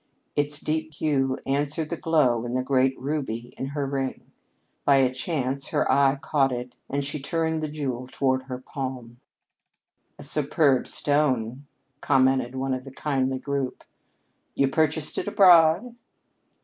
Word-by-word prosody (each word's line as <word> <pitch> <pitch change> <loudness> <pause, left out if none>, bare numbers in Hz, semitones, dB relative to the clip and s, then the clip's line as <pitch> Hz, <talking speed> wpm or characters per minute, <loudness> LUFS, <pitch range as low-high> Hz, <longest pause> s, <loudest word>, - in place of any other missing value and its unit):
Its 145 0 0
deep 155 0 -3
hue 135 -4 0
answered 145 +3 -1
the - - 0
glow 145 -9 +2
in 120 +1 -3
the 130 - 0
great 130 0 +2
ruby 130 -4 -3
in 135 - -4
her 140 0 -3
ring. 135 -1 -3 0.6
By 140 - +5
a 130 -2 +3
chance 135 -1 -2
her - - 0
eye 140 0 +4
caught 140 -1 +1
it 125 0 -5 0.2
and 140 0 -1
she 145 +2 -3
turned 160 +3 -1
the 155 - -2
jewel 130 -5 -4
toward 130 0 0
her 130 -1 -5
palm. 130 -2 -6 1.0
"A - - -10
superb 145 -3 +2
stone," 140 -3 0 0.3
commented 130 -2 +2
one 135 0 -1
of 130 0 -3
the 135 - -10
kindly 135 -1 -1
group. 140 -1 -3 0.7
"You 140 -1 +2
purchased 155 +1 0
it - - -4
abroad?" 185 +3 +5
135 Hz, 150 wpm, -25 LUFS, 130-150 Hz, 1.0 s, By